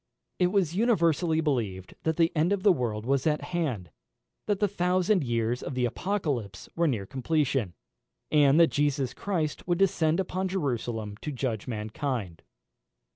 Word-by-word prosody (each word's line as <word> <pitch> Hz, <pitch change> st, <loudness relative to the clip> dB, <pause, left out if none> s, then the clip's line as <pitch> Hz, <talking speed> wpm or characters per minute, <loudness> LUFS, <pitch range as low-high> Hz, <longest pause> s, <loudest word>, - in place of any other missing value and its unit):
It 180 Hz, -, +4 dB
was 180 Hz, -3 st, +1 dB
universally 170 Hz, -, +2 dB
believed 110 Hz, -, -2 dB
that 160 Hz, -1 st, 0 dB
the 165 Hz, -1 st, +3 dB
end 160 Hz, +4 st, +2 dB
of 200 Hz, -2 st, 0 dB
the 205 Hz, -, +7 dB
world 115 Hz, -8 st, -2 dB
was 135 Hz, +3 st, +1 dB
at 150 Hz, -1 st, +1 dB
hand; 125 Hz, -, -2 dB, 0.6 s
that 205 Hz, -2 st, +1 dB
the 205 Hz, -, +3 dB
thousand 185 Hz, 0 st, +1 dB
years 120 Hz, 0 st, -1 dB
of 135 Hz, -, -5 dB
the 125 Hz, -1 st, +1 dB
Apocalypse 135 Hz, -, -2 dB
were 170 Hz, 0 st, +2 dB
near 110 Hz, -9 st, -1 dB
completion, 135 Hz, -, -1 dB, 0.6 s
and 145 Hz, 0 st, +5 dB
that 170 Hz, -, +6 dB
Jesus 140 Hz, -3 st, 0 dB
Christ 165 Hz, -5 st, -3 dB
would 175 Hz, -1 st, +2 dB
descend 175 Hz, -3 st, +2 dB
upon 190 Hz, 0 st, -1 dB
Jerusalem 120 Hz, -, -3 dB
to 150 Hz, -, -5 dB
judge 125 Hz, -5 st, -3 dB
mankind. 110 Hz, -, -4 dB
150 Hz, 155 wpm, -28 LUFS, 120-175 Hz, 0.6 s, the